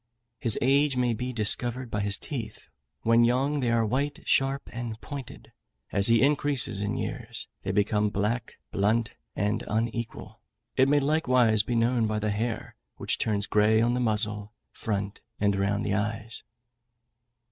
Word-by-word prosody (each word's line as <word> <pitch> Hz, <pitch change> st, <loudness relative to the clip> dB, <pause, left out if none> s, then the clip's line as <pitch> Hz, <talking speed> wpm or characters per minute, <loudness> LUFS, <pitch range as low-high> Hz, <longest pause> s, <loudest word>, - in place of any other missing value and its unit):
His 115 Hz, -3 st, +3 dB
age 140 Hz, +1 st, +3 dB
may 125 Hz, -2 st, +2 dB
be 125 Hz, +3 st, -3 dB
discovered 120 Hz, +2 st, 0 dB
by 105 Hz, -, -1 dB
his 100 Hz, -1 st, -1 dB
teeth; 115 Hz, -8 st, -7 dB, 0.3 s
when 115 Hz, +1 st, +5 dB
young, 135 Hz, +5 st, +2 dB
they 125 Hz, -3 st, 0 dB
are 115 Hz, -1 st, +2 dB
white, 140 Hz, +6 st, -2 dB
sharp, 135 Hz, +1 st, +1 dB
and 115 Hz, -2 st, -5 dB
pointed; 140 Hz, -2 st, -9 dB, 0.4 s
as 100 Hz, 0 st, +6 dB
he 115 Hz, +1 st, +5 dB
increases 140 Hz, -7 st, 0 dB
in 100 Hz, -, -2 dB
years, -, -, -5 dB
they -, -, -2 dB
become 105 Hz, 0 st, +1 dB
black, 105 Hz, +3 st, -2 dB, 0.2 s
blunt, 110 Hz, +3 st, +1 dB, 0.2 s
and 105 Hz, +2 st, -1 dB
unequal: 115 Hz, 0 st, -3 dB, 0.3 s
it 130 Hz, +1 st, +4 dB
may 145 Hz, 0 st, +4 dB
likewise 125 Hz, -7 st, +3 dB
be 120 Hz, +3 st, -3 dB
known 115 Hz, 0 st, +2 dB
by 105 Hz, 0 st, -1 dB
the 105 Hz, 0 st, -1 dB
hair, 110 Hz, +2 st, -3 dB, 0.2 s
which -, -, -2 dB
turns 105 Hz, -2 st, 0 dB
grey 105 Hz, +2 st, +3 dB
on 120 Hz, +2 st, +2 dB
the 125 Hz, -, 0 dB
muzzle, 105 Hz, -2 st, 0 dB, 0.2 s
front, 100 Hz, -2 st, -4 dB, 0.2 s
and 100 Hz, -1 st, +2 dB
round 100 Hz, +2 st, 0 dB
the 100 Hz, -, 0 dB
eyes. 110 Hz, +2 st, -3 dB
115 Hz, 160 wpm, -27 LUFS, 105-125 Hz, 0.4 s, as